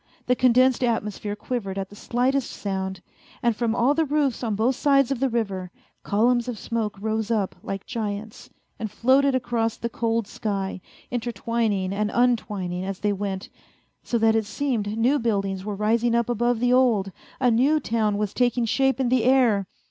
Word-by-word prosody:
The 250 - +2
condensed 255 +1 +4
atmosphere 210 -3 -1
quivered 210 -3 -4
at 195 -1 -3
the - - -11
slightest 255 +4 0
sound, 190 -2 -4 0.4
and 235 -2 +2
from 230 0 0
all 250 +4 +3
the 320 +2 +2
roofs 290 -4 0
on 220 -3 -1
both 235 +5 +1
sides 275 -1 +3
of 270 - -1
the 270 0 +1
river, 195 -6 -2 0.3
columns 235 +4 +2
of 245 -3 -4
smoke 220 -2 -3
rose 220 +1 -2
up 210 -5 0
like 195 0 -5
giants 215 -2 -5 0.3
and 220 -2 -3
floated 265 +5 +3
across 235 -2 -1
the 235 - -3
cold 230 -1 -1
sky, 195 -2 -3 0.3
intertwining 225 -4 -1
and 210 +1 0
untwining 210 -7 0
as 195 0 -5
they 205 -1 +1
went, 195 -1 -4 0.5
so 240 - -1
that 225 0 +3
it 220 -1 +1
seemed 225 -7 -2
new 255 +6 +3
buildings 195 -4 -1
were 210 0 -4
rising 230 +3 +1
up 235 0 +1
above 240 0 +1
the 245 +1 +2
old, 230 -7 +3 0.3
a 250 -2 +3
new 275 +7 +3
town 220 -5 0
was 210 -1 -2
taking 245 -1 +1
shape 270 +3 +1
in 255 -2 +1
the 250 -2 +2
air. 240 -7 +3
230 Hz, 180 wpm, -24 LUFS, 205-245 Hz, 0.5 s, condensed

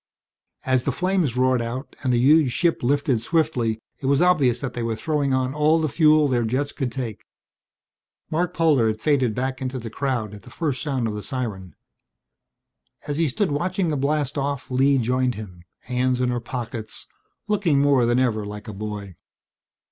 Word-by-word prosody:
As 130 -1 +2
the 140 - -1
flames 180 -6 0
roared 130 -1 +3
out 120 +4 -5
and 130 - 0
the 120 - +3
huge 140 +2 +5
ship 170 -2 +1
lifted 135 -2 +1
swiftly 125 -7 0 0.2
it 135 - -4
was 140 0 +3
obvious 155 -9 +3
that 130 -1 -5
they 120 - -4
were 115 -1 -1
throwing 145 +4 -1
on 130 0 0
all 150 +2 +3
the 160 - +1
fuel 155 0 +4
their 125 -3 +1
jets 130 +6 -1
could 130 -5 -3
take. 120 -5 -5 1.1
Marc 175 +3 0
Polder 155 -9 +3
had 110 0 -1
faded 130 -5 +1
back 130 +1 -2
into 130 0 -3
the 115 -3 -6
crowd 120 -6 -2
at 105 - -10
the - - -14
first 145 -6 -2
sound 135 -6 -1
of 110 - -3
the 105 - -5
siren. 105 -8 -5 1.3
As 145 -1 -3
he 165 -1 +2
stood 160 +6 -1
watching 180 +4 0
the 150 - 0
blastoff 140 -1 -1
Lee 135 +2 +3
joined 125 +1 +1
him, 90 -5 -10 0.2
hands 125 0 0
in 125 -1 +1
her 120 0 -1
pockets, 120 -2 -6 0.4
looking 190 -9 +2
more 140 -4 +4
than 120 +1 +2
ever 120 -5 +1
like 105 +2 -8
a 110 - -6
boy. 100 -2 -6
130 Hz, 185 wpm, -23 LUFS, 120-145 Hz, 1.3 s, huge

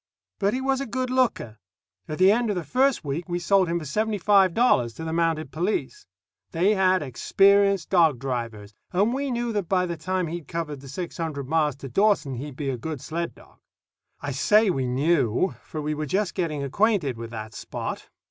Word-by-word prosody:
But 200 +3 +1
he 260 - -2
was 265 0 0
a 275 - -4
good 255 +2 -2
looker. 235 - 0 0.5
At 155 - -4
the 185 +2 +6
end 235 +1 +1
of 205 - 0
the 180 - -2
first 255 - +1
week 155 +6 -4
we 175 - -1
sold 185 +1 +3
him 170 +1 0
for 165 - -5
seventy 215 +9 -1
five 195 -2 +4
dollars 125 - +3
to - - -7
the 160 0 -3
Mounted 165 -3 0
Police. 215 - -2 0.5
They 180 +5 +3
had 185 -3 +3
experienced 195 +8 +3
dog 165 -7 +4
drivers, 115 -5 -5 0.2
and 200 +6 +2
we 275 +1 -2
knew 240 -1 -2
that 205 -5 -2
by 185 -1 +2
the 170 -1 -4
time 185 +1 -1
he'd 165 -2 -6
covered 155 -3 -4
the 135 - -11
six 170 +6 -6
hundred 150 -5 -4
miles 150 -2 +1
to 135 0 -9
Dawson 195 - +2
he'd 135 +2 -6
be 140 -1 -2
a 125 - -4
good 150 +4 -5
sled 170 +5 -4
dog. - - -19 0.6
I 145 - -4
say 210 - +3
we 135 -5 -1
knew, 140 - +1
for 155 - -7
we 150 +1 -1
were 150 0 -4
just 195 +5 0
getting 155 -6 -2
acquainted 175 - +1
with 115 0 -7
that 110 -1 -7
Spot. - - -6
170 Hz, 205 wpm, -25 LUFS, 140-200 Hz, 0.6 s, the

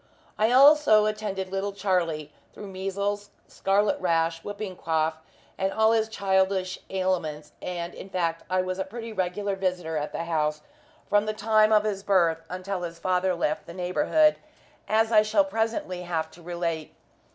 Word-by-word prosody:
I 220 +2 +2
also 270 -5 +6
attended 205 -3 -3
little 195 +1 -2
Charlie 170 -7 -1 0.2
through 205 - -8
measels, 200 +2 -3 0.2
scarlet 200 +1 +1
rash, 165 -2 +1
whooping 205 -2 -6
cough, 160 -1 0 0.4
and 190 0 +1
all 220 +1 +3
his 220 -1 +2
childish 190 -2 0
ailments; 175 -6 -2
and 175 -1 -4
in 195 - -10
fact 170 -3 -1
I 185 0 +1
was 185 +1 -4
a - - +1
pretty 225 +3 -8
regular 195 +1 -1
visitor 180 -4 -2
at 150 0 -3
the - - -3
house 155 -2 -1 0.5
from 205 +1 +2
the 215 - 0
time 215 0 +3
of 210 -1 +5
his 205 -2 -2
birth 170 -5 +2
until 185 +1 -4
his 170 -1 -5
father 185 +1 +1
left 155 -3 -2
the 170 - -9
neighbourhood, 295 - +2 0.5
as 220 +1 +2
I 215 -2 +7
shall 215 -2 +2
presently 210 -3 -2
have 165 -3 -3
to 175 - -16
relate. 170 -2 -4
190 Hz, 165 wpm, -26 LUFS, 170-210 Hz, 0.5 s, I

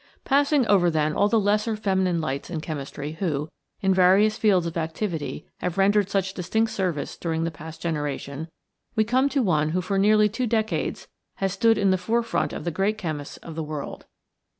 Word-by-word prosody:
Passing 285 -1 +3
over, 190 -5 +4
then, 155 -1 +1
all 205 - +3
the 225 +1 +3
lesser 210 +2 +1
feminine 190 -4 +1
lights 140 -3 -3
in 170 -3 -3
chemistry 145 -1 -5
who, 155 -5 -1 0.3
in 190 -1 +3
various 190 +4 +5
fields 195 -6 +3
of 165 - -4
activity, 165 0 -3
have 180 0 -3
rendered 200 0 +3
such 195 -1 0
distinct 220 +5 0
service 180 -8 -2
during 165 -1 -2
the 165 - -1
past 160 +1 -10
generation, 150 -1 -3 0.5
we 220 - +4
come 255 +5 +2
to 275 -1 +1
one 155 -6 +2
who 180 +3 0
for 195 +2 -1
nearly 210 +1 +5
two 235 +4 -2
decades 220 -1 -1 0.3
has 195 -1 -1
stood 225 +1 +3
in 200 -2 +3
the 185 - +2
forefront 230 +5 0
of - - -6
the 170 - -2
great 195 +5 0
chemists 155 -7 -5
of 165 - -7
the 160 - -4
world. 150 -2 -6
190 Hz, 190 wpm, -25 LUFS, 160-215 Hz, 0.5 s, various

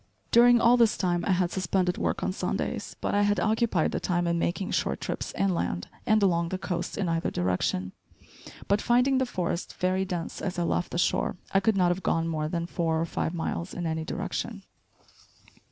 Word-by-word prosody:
During 240 0 +7
all 235 +1 +5
this 230 -2 +4
time 175 -2 0
I 195 - +3
had 180 -1 +1
suspended 180 0 0
work - - -1
on - - 0
Sundays, - - -3
but - - -1
I 205 - +3
had 205 0 +2
occupied 220 -6 +1
the - - -1
time 175 -1 0
in 170 0 +1
making 180 +3 -1
short - - 0
trips - - -4
inland, 170 - -1 0.2
and 215 -1 +4
along 170 -3 +2
the 185 - -2
coast 175 -2 -4
in 195 - -1
either 165 0 0
direction; 90 0 -1 0.8
but 200 +1 +2
finding 250 +3 +3
the 260 - 0
forest 180 -5 -3
very 185 +1 +1
dense 180 -3 -4
as 190 -1 -3
I 175 - +1
left 175 +1 0
the - - -3
shore, 175 - +1 0.2
I 195 - +5
could 195 +1 +1
not 180 -2 +4
have 175 +2 -1
gone 165 -1 0
more 155 -2 -1
than 170 +1 -2
four 160 -1 -1
or 165 - 0
five 165 +1 -2
miles 170 +1 -3
in 175 - -3
any 160 0 -1
direction. - - -4
180 Hz, 200 wpm, -27 LUFS, 170-200 Hz, 0.8 s, During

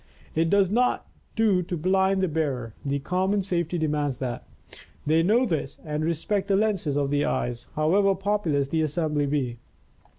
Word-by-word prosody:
It 165 +1 +1
does 200 -1 +3
not 250 +3 +1 0.3
do 215 -5 +3
to 175 0 -4
blind 190 +3 +2
the - - +3
bearer; 140 -8 -2
the 140 0 -1
common 190 +7 0
safety 175 -2 -1
demands 150 -4 -1
that. 125 -2 -5 0.6
They 160 +2 +3
know 220 +9 +3
this 155 - -2
and 150 0 -2
respect 180 +5 -1
the 200 - +3
lenses 195 -9 +1
of 140 -1 0
the 145 0 +2
eyes, 120 0 -2
however 195 +6 +3
populous 185 -8 0
the 160 +1 +1
assembly 150 -1 0
be. 130 -5 -1
165 Hz, 165 wpm, -25 LUFS, 145-195 Hz, 0.6 s, does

